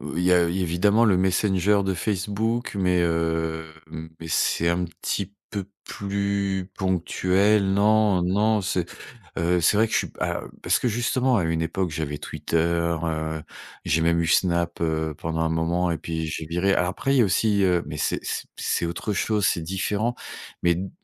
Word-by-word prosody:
Heu, - - -6
il - - 0
y 90 - +4
a 90 -1 +5
évidemment 95 +5 +2
le 95 - +4
Messenger 95 +1 +2
de 95 -1 0
Facebook, 105 +5 -2
mais 90 -2 +2
heu, 80 -1 -1 0.5
mais 80 - -7
c'est 85 +1 +1
un 85 +1 +1
petit 90 +3 -4 0.2
peu 100 -3 -4 0.2
plus 100 -1 -2
ponctuel. 95 +2 +2
Non 105 -2 +3
non. 105 +3 +2
C'est, 90 -3 -1 0.5
heu, 85 +1 +2
c'est 90 +5 +3
vrai 110 - +4
que - - -9
je - - +4
suis - - -1
pas - - -3 0.2
Parce - - +2
que, 125 - 0
justement, 125 +2 +1
à 90 - +1
une 80 0 0
époque, 90 +2 -1
j'avais 75 -1 -3
Twitter. 85 - -4
Heu, 80 -2 -1 0.4
j'ai 80 - +1
même 85 0 +2
eu - - -1
Snap, 85 -1 +1
heu, 80 -1 -1
pendant 80 0 -3
un 80 0 +1
moment, 85 +2 0
et 85 - -1
puis 80 -1 -3
j'ai 80 0 -4
viré. 90 +4 +1
Alors 90 - +1
après, 135 +9 -1
il 135 - +3
y - - +6
a - - +4
aussi, 100 +1 +2
heu 90 -2 +2
Mais 75 -1 -6
c'est - - 0
c'est - - -3
c'est 85 - -1
autre 90 +5 -3
chose, 105 -2 +1
c'est 85 - +1
différent. 100 +6 -1 0.5
Mais 85 -1 +4
d 95 +2 -4
90 Hz, 190 wpm, -24 LUFS, 85-100 Hz, 0.5 s, y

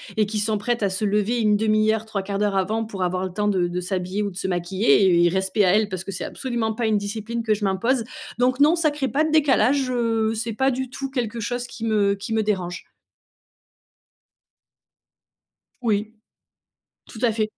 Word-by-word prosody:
et 215 - +3
qui 210 +1 -3
sont 215 0 0
prêtes 235 +2 -1
à 200 - +2
se 190 +3 -3
lever 210 +3 +1
1/2 215 0 +3
heure, 220 0 -3
3/4 200 -2 -3
d'heure 205 -1 +1
avant 215 +4 0
pour 195 -4 -4
avoir 185 +1 -1
le 185 - -6
temps 210 +1 0
de 180 -3 +1
de 180 +1 -3
s'habiller 185 +2 -2
ou 200 - -2
de 180 - -12
se 190 - -3
maquiller 190 +4 +2
et 175 -2 +4
et - - +5
respect 190 +3 +1
à 180 - +4
elles, 215 -1 +2
parce 185 -1 -4
que - - -5
c'est - - -5
absolument 235 -4 -2
pas 230 0 -1
une 215 -1 +2
discipline 220 +3 -4
que 220 -1 +2
je 210 0 -2
m'impose, 230 +6 +1 0.3
donc 255 +2 +2
non, 305 +4 +6
ça 310 -3 +2
crée 290 -2 -2
pas 290 +7 +1
de 315 - -1
décalage, 275 -3 +3
heu, 225 -2 +1
c'est 225 0 -3
pas 265 +4 +2
du 260 0 -3
tout 270 +2 -5
quelque 235 -4 -3
chose 245 +2 -3
qui 230 - -9
me 205 -2 +2
qui 200 +4 -8
me 220 0 +2
dérange. 185 -4 -2 3.0
Oui, 215 -1 0 1.0
tout 220 - -10
à 240 -3 +3
fait, 220 0 0
215 Hz, 210 wpm, -23 LUFS, 195-235 Hz, 3.0 s, non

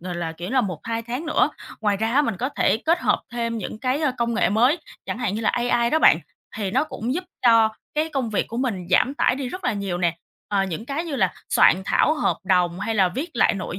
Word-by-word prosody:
gọi 180 0 -5
là, 170 -2 -3
kiểu 175 +4 -7
là, 260 - +3
1-2 225 +4 -3
tháng 250 +7 -5
nữa. 310 - +2 0.3
Ngoài 205 -2 +1
ra 225 +3 -1
á, 290 - +5
mình 230 -8 -2
có 250 +7 -2
thể 280 - +1
kết 320 +9 +1
hợp - - +2
thêm 230 -1 -2
những 215 +1 -6
cái, 255 +4 -1
a, 295 - +2
công 235 0 0
nghệ 235 - +2
mới, 245 - +3 0.3
chẳng - - -4
hạn 235 -6 -1
như 220 - -3
là 220 - +2
AI 240 -1 +1
đó 315 - +3
bạn, - - +6 0.4
thì 200 -3 -2
nó 250 - +2
cũng 250 -4 -4
giúp 365 +3 -3 0.2
cho 230 -2 +6 0.3
cái 310 +2 0
công 270 -7 -2
việc 210 - 0
của 230 - -6
mình 225 -9 -2
giảm 255 +9 +3
tải - - +2
đi 265 -1 -4
rất 370 +7 -7
là - - +1
nhiều 200 -4 -3
nè, 175 -2 0 0.3
ờ, 200 -2 +1
những 190 +4 -5
cái 285 +5 -3
như 310 -5 -4
là 190 -7 +2 0.2
soạn 185 - +4
thảo 310 - +3
hợp 305 - 0
đồng, 180 -1 +1
hay 225 +3 -2
là 190 -3 +4
viết 275 - -4
lại 240 - +3
nội 185 -2 -5
230 Hz, 260 wpm, -23 LUFS, 195-265 Hz, 0.4 s, bạn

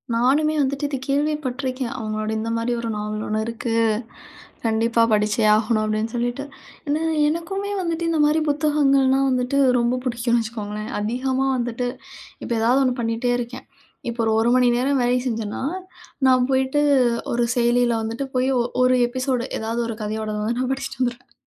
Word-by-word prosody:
நானுமே 285 +6 +3
வந்துட்டு 275 +1 -1
இத 280 - -3
கேள்விப்பட்டிருக்கேன். 275 -3 -1
அவங்களோட 215 -1 -3
இந்த 225 - -3
மாரி 230 +1 -1
ஒரு 230 - -3
நாவல் 210 +1 -3
ஒண்ணு 215 0 -1
இருக்கு. 230 0 -3 0.9
கண்டிப்பா 230 +1 +2
படிச்சே 210 +1 +1
ஆகணு 215 +1 +1
அப்படின்னு 215 +1 -1
சொல்லிட்டு. 245 +3 -2 0.4
ஏன்னா, 300 +2 0 0.3
எனக்குமே 390 +6 -2
வந்துட்டு 335 -1 -2
இந்த 325 - 0
மாரி 300 +2 +3
புத்தகங்கள்னா 280 -3 +3
வந்துட்டு 255 +1 0 0.2
ரொம்ப 240 +1 +1
பிடிக்கும்னு 235 -1 +1
வச்சுக்கோங்களேன். 215 -2 -5
அதிகமா 255 +5 -1
வந்துட்டு 240 0 -2 0.6
இப்ப - - -7
ஏதாவது 245 +4 +3
ஒண்ணு 255 - +1
பண்ணிட்டே 230 +1 -1
இருக்கேன். 245 +1 -6 0.4
இப்ப 235 0 -5
ஒரு 220 - +2
1 235 - +2
மணி 250 - +4
நேரம் 270 +2 +1
வேலை 245 +1 +2
செஞ்சன்னா, 225 -2 -3 0.6
நான் 255 -1 +4
போயிட்டு 265 +2 +2 0.5
ஒரு 240 0 +1
செயலில 240 0 +3
வந்துட்டு 230 +5 -3
போய், 255 +1 +2
ஒ - - +3 0.2
ஒரு 255 0 +4
எபிசோடு, 255 0 -1
ஏதாவது 225 +2 -2
ஒரு 225 - -4
கதையோடத 215 0 -3
வந்து 235 +3 -1
நான் 255 0 -1
படிச்சுட்டு 270 -1 -5
வந்துடுவேன். 245 0 -3
245 Hz, 155 wpm, -22 LUFS, 225-270 Hz, 0.9 s, மணி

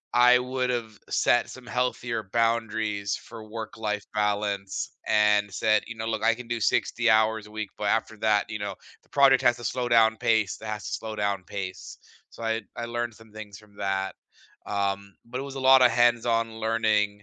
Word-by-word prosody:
I 125 0 +7
would've 125 -4 -2
set 120 - +2
some 130 -1 -11
healthier 120 -4 -2
boundaries 110 -3 0
for 110 -2 -11
work-life 110 -2 -4
balance 100 -2 -1 0.2
and 105 -1 +3
said, 110 +1 +2
"You 120 - -7
know, 110 - -5
look, 115 - -2
I 115 0 +4
can 125 0 -10
do 120 -1 -3
60 115 +2 +1
hours 110 -1 +3
a 105 - -16
week, 110 -2 -5
but 105 - -4
after 110 0 0
that, 105 -1 +2
you 105 -1 -4
know, 105 - -4 0.3
the - - -31
project 140 -1 +5
has 120 0 +3
to 120 - -10
slow 125 +2 -2
down 110 -1 +5
pace. 110 -4 +1
It 110 - -8
has 105 -1 -4
to - - -4
slow 110 -1 -4
down 100 -2 -1
pace." 95 -2 -6 0.3
So 115 - -11
I'd 115 -1 -2
I 120 - -4
learned 120 -1 -3
some 110 -1 -17
things 105 -2 -9
from 105 -1 -20
that. 95 0 -2 0.5
Um, 100 0 -2
but 120 +2 -5
it 135 - -4
was 135 - -9
a 135 - -4
lot 130 -1 +8
of 125 - +7
hands-on 115 -1 +2
learning. 110 -2 +2
110 Hz, 195 wpm, -26 LUFS, 105-120 Hz, 0.5 s, lot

